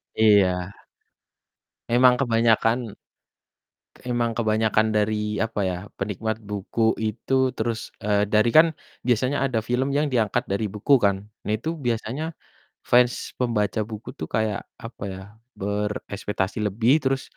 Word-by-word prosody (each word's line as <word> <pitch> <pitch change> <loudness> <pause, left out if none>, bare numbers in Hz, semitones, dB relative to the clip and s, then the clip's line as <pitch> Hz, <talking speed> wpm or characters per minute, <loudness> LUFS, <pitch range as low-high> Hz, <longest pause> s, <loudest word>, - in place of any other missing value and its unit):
Iya. 95 -5 +4 1.2
Emang 125 +1 +6
kebanyakan 115 -2 +2 1.1
emang 120 -1 0
kebanyakan 110 -1 +2
dari 105 0 0
apa 110 -1 -2
ya, 90 - -3 0.2
penikmat 105 +2 -2
buku 105 +2 0
itu 110 +4 -3 0.2
terus, 115 0 -1 0.2
eee, 105 0 +2
dari 110 +2 +4
kan 160 +2 +8 0.4
biasanya 125 +3 +2
ada 120 -4 0
film 125 +4 0
yang 150 +1 +2
diangkat 110 -5 +1
dari 100 +2 0
buku 105 +7 +2
kan. 100 -1 +3 0.3
Nah - - 0
itu 135 +9 -4 0.2
biasanya 120 +4 -2 0.7
fans 125 0 +5 0.3
pembaca 110 -5 0
buku 110 -1 -7
tuh 80 - -4
kayak 110 -2 0 0.3
apa 115 -1 -8
ya, 95 - -8 0.4
berekspektasi 100 -1 -3
lebih 110 +5 +1
terus 135 0 +1
110 Hz, 125 wpm, -24 LUFS, 105-120 Hz, 1.2 s, kan